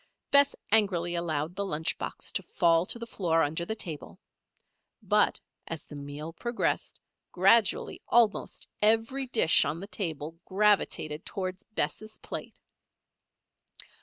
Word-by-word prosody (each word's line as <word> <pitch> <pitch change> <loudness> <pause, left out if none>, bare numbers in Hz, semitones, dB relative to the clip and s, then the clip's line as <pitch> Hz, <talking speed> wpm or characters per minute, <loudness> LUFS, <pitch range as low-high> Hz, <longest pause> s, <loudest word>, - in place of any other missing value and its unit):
Bess 280 0 +5 0.2
angrily 185 -6 +3
allowed 165 -1 -2
the 200 - -2
lunch 160 -5 -1
box - - -4
to - - -2
fall 170 +1 +2
to - - -2
the 235 - -6
floor 170 -7 +1
under 160 +4 -1
the 220 - -3
table. 160 - -4 0.8
But, - - +2 0.3
as - - -5
the - - -11
meal 145 +3 -7
progressed, 235 +7 -2 0.3
gradually 195 +4 +3
almost 230 -4 +2
every 225 +5 +2
dish 225 -9 +4
on 160 - -2
the 195 - -6
table 165 -5 -4
gravitated 190 -6 +1
toward 185 -1 -4 0.2
Bess' 215 0 -2
plate. - - -7
185 Hz, 130 wpm, -29 LUFS, 160-215 Hz, 0.8 s, Bess